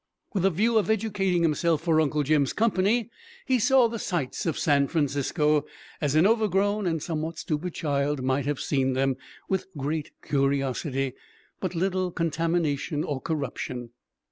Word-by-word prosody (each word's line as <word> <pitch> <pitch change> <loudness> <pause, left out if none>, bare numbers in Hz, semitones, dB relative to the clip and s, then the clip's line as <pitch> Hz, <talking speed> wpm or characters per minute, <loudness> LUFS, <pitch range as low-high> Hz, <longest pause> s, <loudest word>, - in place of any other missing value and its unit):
With 190 -3 +1
a - - +6
view 220 +6 +2
of 215 - -2
educating 195 -5 +1
himself 160 0 +1
for 160 -2 +3
Uncle 150 -1 +1
Jim's 145 -1 +2
company, 220 +1 +1 0.3
he 260 -3 +2
"saw 255 +1 +5
the 230 0 -5
sights" 170 -5 -2
of 160 - 0
San 140 -2 +3
Francisco 150 0 +1 0.4
as 145 -1 +1
an 155 +3 +5
over 220 +1 +3
grown 205 +1 +1
and 165 -3 -1
somewhat 160 0 -3
stupid 160 +3 -3
child 145 -2 -1
might 130 +1 0
have 145 -1 -1
seen 135 -2 +1
them 135 0 +1 0.3
with 190 -1 -1
great 145 +2 -2
curiosity, 135 -1 0 0.5
but 185 -2 -3
little 185 +1 0
contamination 165 -3 0
or 140 -3 -3
corruption. 130 -5 -4
160 Hz, 155 wpm, -26 LUFS, 140-190 Hz, 0.5 s, a